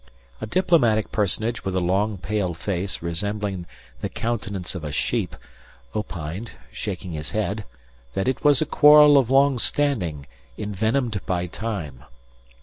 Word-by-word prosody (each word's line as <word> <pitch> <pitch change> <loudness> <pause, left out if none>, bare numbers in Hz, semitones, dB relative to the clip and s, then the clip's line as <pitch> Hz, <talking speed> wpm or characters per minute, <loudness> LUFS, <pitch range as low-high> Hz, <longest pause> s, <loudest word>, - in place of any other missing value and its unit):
A - - -4
diplomatic 120 - +2
personage 110 +3 0
with 95 -1 -3
a - - +2
long 95 +4 0
pale 95 -2 -2
face 90 +2 -2
resembling 95 +1 -2 0.3
the - - -2
countenance 100 -6 -3
of 90 -4 -6
a 75 - -4
sheep, - - -1 0.6
opined, 95 +1 -5 0.2
shaking 95 -3 -5
his 75 -4 -5
head, - - -2 0.5
that 95 - -1
it 130 - -1
was 145 0 +6
a - - -5
quarrel 150 0 +7
of 125 -3 0
long 135 -1 +4
standing 95 - +1 0.3
envenomed 110 +1 -1
by 90 -2 0
time. 90 - -5
105 Hz, 140 wpm, -23 LUFS, 90-120 Hz, 0.6 s, quarrel